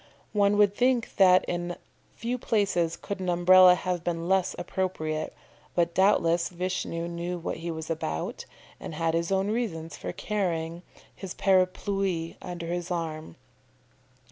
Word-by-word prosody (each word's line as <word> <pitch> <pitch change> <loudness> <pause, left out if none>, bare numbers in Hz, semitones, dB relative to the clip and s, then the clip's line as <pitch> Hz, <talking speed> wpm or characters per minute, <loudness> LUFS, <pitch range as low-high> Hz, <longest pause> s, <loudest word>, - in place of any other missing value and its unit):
One 205 -1 +3
would 205 -1 +5
think 250 -1 +1
that 185 -2 +6
in 175 0 -3 0.4
few 245 +2 -3
places 190 -8 +1
could 200 -1 -5
an 185 -1 -2
Umbrella 180 +1 +7
have 180 -1 -3
been 170 -1 -2
less 190 -1 +2
appropriate, 175 -4 -2 0.4
but 170 -1 +2
doubtless 170 -3 +3
Vishnu 180 -2 -3
knew 170 +1 -4
what 170 - -4
he 165 +1 -5
was 160 -1 -5
about, 115 - -3 0.3
and 155 - -7
had 165 +1 0
his 170 +2 0
own 195 +2 +1
reasons 170 -9 -3
for - - -5
carrying 170 -5 -2 0.3
his 190 -2 -7
Parapluie 185 -2 +1
under 175 -2 -6
his 175 +1 -3
arm. 160 -3 -4
175 Hz, 145 wpm, -27 LUFS, 165-190 Hz, 0.4 s, Umbrella